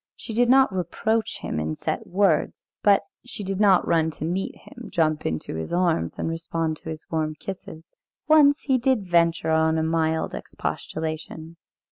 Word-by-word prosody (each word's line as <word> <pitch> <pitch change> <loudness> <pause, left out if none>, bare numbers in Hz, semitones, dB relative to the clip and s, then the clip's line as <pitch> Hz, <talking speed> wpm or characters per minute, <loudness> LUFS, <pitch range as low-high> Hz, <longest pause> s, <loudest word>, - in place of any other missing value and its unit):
She 225 - -8
did 240 +2 +3
not 265 -4 +5
reproach 215 +5 -1
him - - -3
in 80 0 -2
set 225 - -3
words, 185 -4 +2 0.3
but 200 -1 +4 0.2
she 245 -3 -6
did 195 0 -3
not 195 -4 +4
run 160 -1 +2
to - - -4
meet 180 +4 -2
him, 245 -6 -12
jump 155 -3 +1
into 80 -1 -3
his 80 0 -5
arms, 170 - +1
and - - -2
respond 165 -1 -2
to 160 - -9
his 160 0 -7
warm 155 -1 -1
kisses. 170 -3 -8 0.4
Once 300 -1 +5
he 265 -2 +2
did 250 -5 +1
venture 170 -2 +2
on 160 0 +3
a 160 - +1
mild 160 0 0
expostulation. 160 +1 -5
170 Hz, 170 wpm, -24 LUFS, 160-210 Hz, 0.4 s, not